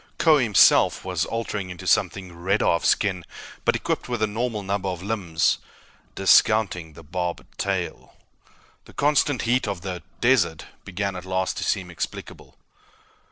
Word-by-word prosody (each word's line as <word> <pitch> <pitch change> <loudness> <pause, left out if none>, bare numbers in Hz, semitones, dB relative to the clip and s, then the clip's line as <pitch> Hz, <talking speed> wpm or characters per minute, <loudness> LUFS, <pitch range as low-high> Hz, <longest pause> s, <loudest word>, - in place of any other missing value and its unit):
Kbo 155 -4 +5
himself 110 -5 +4
was - - -1
altering 105 -4 -3
into 90 -3 -9
something 95 -3 0
redder 95 +5 0
of 85 - +2
skin 95 -4 +1 0.4
but - - +2
equipped - - -2
with 120 -3 -1
a - - +5
normal 110 0 -3
number 100 0 -2
of 90 -1 -5
limbs, 95 -6 0 0.6
discounting 95 -4 +3
the 80 - -13
barbed 90 +2 -5
tail. 95 -3 -3 0.7
The - - -16
constant 145 -3 +2
heat 120 0 +1
of 100 -4 -3
the 90 -1 -5 0.2
"desert" 85 -11 +2 0.2
began, 100 +1 -3
at 90 - -6
last, 95 0 -1
to - - -3
seem 95 -3 -1
explicable. 85 - -7
95 Hz, 150 wpm, -24 LUFS, 90-110 Hz, 0.7 s, Kbo